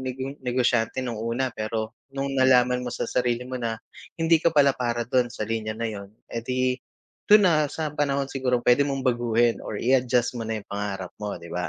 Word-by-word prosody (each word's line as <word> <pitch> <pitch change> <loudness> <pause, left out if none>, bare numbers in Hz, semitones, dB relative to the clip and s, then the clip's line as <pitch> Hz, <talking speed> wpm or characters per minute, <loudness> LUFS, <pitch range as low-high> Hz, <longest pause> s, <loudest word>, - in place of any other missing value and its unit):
nigeng 130 +1 -4
negosyante 125 -1 0
nung 115 -3 -4
una 120 +3 -1
pero 110 +1 -3 0.2
nung 135 0 -2
nalaman 125 -2 +4
mo 125 - -4
sa 120 - -3
sarili 125 -1 0
mo 130 0 -5
na, 115 -1 -2 0.4
hindi 165 -1 +3
ka 170 - +4
pala 140 -1 +6
para 120 -2 -2
dun 125 +1 +1
sa 110 - -5
linya 110 0 -3
na 115 - -3
yun, 100 -2 -7 0.2
eh 115 - -2
di 130 +1 0 0.6
dun 210 0 +8
na 155 -5 +3
sa 155 0 -4
panahon 140 -2 0
sigurong 125 -3 0
pwede 125 +3 +5
mong 135 -1 -2
baguhin 120 -2 +2
or 105 - -5
i-adjust 125 0 +2
mo - - -3
na 110 - -1
yung - - -35
pangarap 100 -2 -4
mo. 105 -1 -3
'Di 85 -1 -11
ba? 90 0 -2
125 Hz, 205 wpm, -25 LUFS, 115-130 Hz, 0.6 s, dun